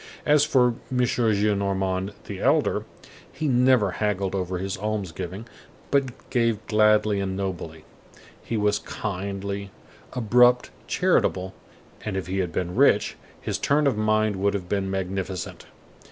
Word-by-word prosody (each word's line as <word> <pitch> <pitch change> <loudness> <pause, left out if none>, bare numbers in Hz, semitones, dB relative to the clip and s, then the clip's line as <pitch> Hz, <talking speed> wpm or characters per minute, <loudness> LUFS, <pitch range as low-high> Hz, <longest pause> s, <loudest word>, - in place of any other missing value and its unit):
As 150 -1 +5
for 130 -5 +3 0.2
M. 130 - -1
Gillenormand 100 -5 +1
the - - -6
elder, - - +2 0.5
he 155 - -3
never 125 -5 +4
haggled 100 -1 -1
over 95 -1 -2
his 95 +1 -3
alms 105 -3 -2
giving, 95 +7 -6 0.5
but 135 -3 0
gave 115 -4 +1
gladly 105 -1 +3
and 95 -1 -2
nobly. 85 -5 -5 0.6
He 115 - -2
was 105 0 +2
kindly, 100 0 -4 0.4
abrupt, 125 +1 +4 0.2
charitable, 95 +1 +1 0.5
and 105 -3 -3
if 95 - -3
he 95 +3 -2
had 90 -3 -1
been 90 +2 -2
rich, 110 -5 +4 0.2
his - - -3
turn 145 +1 +2
of 140 - +3
mind 110 -1 +1
would 100 +1 +1
have 90 -3 -4
been 95 0 -1
magnificent. 95 -1 -4
100 Hz, 140 wpm, -25 LUFS, 95-115 Hz, 0.6 s, As